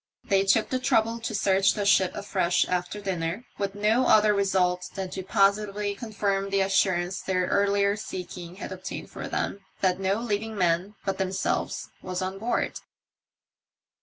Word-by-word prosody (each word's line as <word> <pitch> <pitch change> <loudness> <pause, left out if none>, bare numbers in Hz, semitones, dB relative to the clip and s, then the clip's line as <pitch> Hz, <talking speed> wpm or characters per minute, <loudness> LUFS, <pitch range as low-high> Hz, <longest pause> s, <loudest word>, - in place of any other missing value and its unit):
They 195 0 +2
took 200 +3 +3
the 255 - 0
trouble 230 -2 +2
to 230 -1 -4
search 195 -1 +3
the 205 -2 -1
ship 195 -2 +4
afresh 190 -4 +1
after 180 +3 -2
dinner, 190 +2 -3
with 200 -1 -2
no 220 +5 +2
other 210 0 +6
result 185 -3 +1
than 190 -2 -4
to 190 - -4
positively 200 +2 +1
confirm 200 -2 -2
the 195 0 +2
assurance 190 -1 +1
their 185 -1 0
earlier 200 +1 +2
seeking 180 -3 -7
had 195 - -7
obtained - - -7
for - - -6
them, 200 - -2 0.2
that 185 -1 +2
no 195 +1 +1
living 220 -1 -2
man 180 +3 +1
bat 195 -1 -2
themselves 190 0 -1
was 185 0 -3
on 190 +1 -4
board. 235 +3 -1
195 Hz, 160 wpm, -26 LUFS, 185-205 Hz, 0.2 s, other